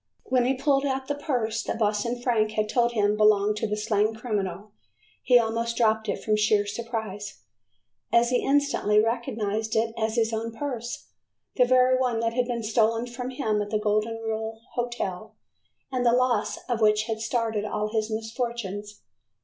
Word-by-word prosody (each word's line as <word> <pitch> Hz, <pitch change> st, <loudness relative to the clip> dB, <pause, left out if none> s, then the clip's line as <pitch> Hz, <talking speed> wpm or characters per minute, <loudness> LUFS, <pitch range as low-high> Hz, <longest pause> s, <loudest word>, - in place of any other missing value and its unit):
When 255 Hz, -1 st, +1 dB
he 265 Hz, +2 st, +2 dB
pulled 275 Hz, +1 st, +2 dB
out 265 Hz, -1 st, -2 dB
the 285 Hz, -, 0 dB
purse 240 Hz, -6 st, -1 dB
that -, -, -3 dB
Boston 220 Hz, +2 st, 0 dB
Frank 225 Hz, -3 st, +1 dB
had 215 Hz, -1 st, 0 dB
told 240 Hz, +2 st, +1 dB
him 210 Hz, -2 st, +2 dB
belonged 210 Hz, 0 st, +3 dB
to 220 Hz, -, -1 dB
the 210 Hz, 0 st, -2 dB
slain 215 Hz, 0 st, +1 dB
criminal, 210 Hz, -3 st, -3 dB, 0.5 s
he 250 Hz, -, +5 dB
almost 230 Hz, 0 st, 0 dB
dropped 220 Hz, -1 st, +2 dB
it -, -, -3 dB
from 215 Hz, -, +2 dB
sheer 210 Hz, -1 st, +3 dB
surprise, 215 Hz, -2 st, -5 dB, 0.7 s
as 235 Hz, +1 st, +4 dB
he 250 Hz, -, +2 dB
instantly 280 Hz, -7 st, +2 dB
recognized 220 Hz, -2 st, -1 dB
it 225 Hz, 0 st, +1 dB
as 220 Hz, 0 st, -1 dB
his 230 Hz, -1 st, +1 dB
own 225 Hz, +1 st, -3 dB
purse, 240 Hz, -2 st, -5 dB, 0.5 s
the 250 Hz, -, +5 dB
very 255 Hz, +1 st, +4 dB
one 245 Hz, -3 st, +1 dB
that 230 Hz, 0 st, 0 dB
had 250 Hz, 0 st, 0 dB
been 235 Hz, -2 st, -3 dB
stolen 225 Hz, +1 st, +2 dB
from 245 Hz, +1 st, -6 dB
him 220 Hz, -5 st, -1 dB
at 205 Hz, -, -4 dB
the 215 Hz, -, +1 dB
Golden 215 Hz, +2 st, 0 dB
Rule 225 Hz, 0 st, -4 dB
Hotel, 220 Hz, -4 st, -4 dB, 0.6 s
and 255 Hz, -2 st, 0 dB
the 235 Hz, -1 st, +4 dB
loss 245 Hz, -3 st, +1 dB
of 240 Hz, -3 st, -1 dB
which 210 Hz, 0 st, +4 dB
had 220 Hz, -1 st, -3 dB
started 225 Hz, -2 st, -1 dB
all 210 Hz, 0 st, -2 dB
of 215 Hz, -, -6 dB
his 220 Hz, -1 st, 0 dB
misfortunes. 220 Hz, -2 st, -4 dB
225 Hz, 180 wpm, -26 LUFS, 215-240 Hz, 0.7 s, he